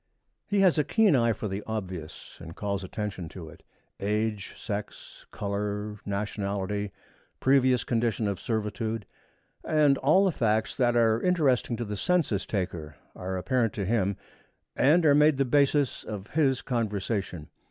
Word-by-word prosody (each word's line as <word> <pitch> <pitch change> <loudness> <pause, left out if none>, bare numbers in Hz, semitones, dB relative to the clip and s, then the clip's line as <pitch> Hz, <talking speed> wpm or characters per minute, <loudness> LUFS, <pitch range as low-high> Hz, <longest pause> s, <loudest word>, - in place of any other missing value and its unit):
He 200 -1 +2
has 185 -5 +4
a - - +4
keen 215 -5 +3
eye 115 -2 +3
for 110 - -3
the 100 +1 -4
obvious, 95 -7 -6
and 85 0 -9
calls 100 -1 -3
attention 95 -3 -5
to 80 -2 -9
it. - - -15 0.4
Age, 105 0 -2
sex, 105 -2 -7
color, 105 +1 -3
nationality, 100 0 -2 0.5
previous 130 -2 +3
condition 115 -3 0
of 100 -3 -2
servitude, 110 0 -2 0.6
and 150 -3 +3
all 155 +9 +4
the 190 - +3
facts 110 -6 0
that 120 -2 +1
are 115 -1 +3
interesting 140 -9 +2
to 120 - -3
the 105 0 -4
census 140 - 0
taker, 85 -7 -3 0.2
are 95 +1 -4
apparent 115 +3 0
to 100 - -3
him 100 -2 0 0.6
and 160 +5 +4
are 145 - +6
made 150 0 +5
the 135 - +2
basis 140 0 +2
of 105 -1 -7
his 135 -4 +2
conversation. 105 - -2
110 Hz, 150 wpm, -27 LUFS, 100-130 Hz, 0.6 s, are